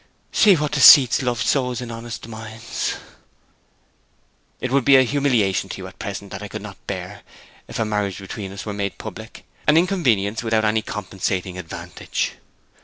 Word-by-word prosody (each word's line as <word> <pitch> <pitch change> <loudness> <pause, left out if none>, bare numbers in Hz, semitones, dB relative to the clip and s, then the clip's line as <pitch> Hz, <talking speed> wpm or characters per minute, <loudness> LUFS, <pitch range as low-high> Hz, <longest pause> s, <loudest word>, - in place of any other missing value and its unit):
'See 205 -3 +6
what 150 -2 -1
deceits 140 -3 +8
love 125 -3 -1
sows 125 -3 0
in 120 -2 -6
honest 115 0 -7
minds!' 110 0 -5 1.6
'It 130 - -3
would 135 -1 +3
be 140 +1 +6
a 130 - +7
humiliation 125 -8 +1
to - - -6
you - - -7
at - - -12
present 100 0 -6
that 95 - -6
I 105 - -6
could 105 0 -7
not 105 -2 -11
bear 95 +1 -5 0.5
if - - -7
a 115 - 0
marriage 105 -3 -1
between 95 0 -7
us 100 - -8
were 105 - -4
made 100 -1 -3
public; - - -9 0.2
an 150 +1 +6
inconvenience 125 - +1
without 110 -1 +1
any 110 +1 +2
compensating 95 -3 -3
advantage.' 85 -1 -4
110 Hz, 170 wpm, -22 LUFS, 100-125 Hz, 1.6 s, deceits